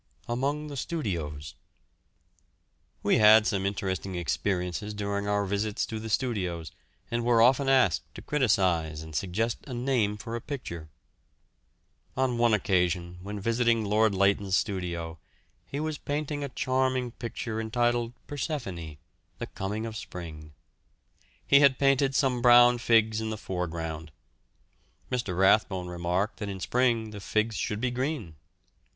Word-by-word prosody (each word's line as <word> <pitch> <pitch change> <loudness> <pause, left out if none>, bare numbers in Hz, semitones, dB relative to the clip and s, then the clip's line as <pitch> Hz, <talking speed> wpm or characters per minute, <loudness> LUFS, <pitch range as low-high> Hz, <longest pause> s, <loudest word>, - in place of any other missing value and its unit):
AMONG 140 +5 -1
THE 145 -2 -7
STUDIOS. 85 - -4 1.5
We - - +3
had 110 0 +7
some 100 -2 0
interesting 95 -1 -3
experiences 90 +3 -2
during 100 0 -2
our 100 0 +1
visits 100 +2 -1
to 110 - -5
the 110 +1 -6
studios, 95 -9 -1 0.4
and 120 0 0
were 120 -1 +3
often 135 +4 +4
asked 130 - +2
to - - -9
criticise 90 - +1
and 80 0 -10
suggest 110 +7 -1
a 130 - -5
name 120 -5 0
for 115 +2 -6
a 120 - -4
picture. 85 - -6 1.3
On 130 -2 +1
one 120 -1 +4
occasion 90 -3 0
when 100 +2 -6
visiting 115 +1 +1
Lord 105 0 +2
Leighton's 100 0 +2
studio, 85 -4 -3 0.5
he 140 - -4
was 155 -1 -3
painting 145 0 -3
a 140 - -3
charming 130 -1 0
picture 115 -1 -4
entitled 120 +1 0
"Persephone," 115 - -5 0.4
the - - -4
coming 105 +4 -3
of 110 -1 -6
spring. 80 -6 -8 0.9
He 140 - +6
had 140 -2 +5
painted 135 -1 +3
some 130 -3 +2
brown 120 0 +7
figs 110 -2 +3
in 110 - -3
the 110 - -3
foreground. 80 -5 -4 1.0
Mr. 110 -8 -2
Rathbone 95 -2 +3
remarked 90 +5 -1
that 105 -2 -4
in 95 -1 -5
spring 115 0 +1
the 105 - -7
figs 110 +2 0
should 105 +1 -2
be 125 +1 0
green. 125 - -3
110 Hz, 140 wpm, -28 LUFS, 95-125 Hz, 1.5 s, had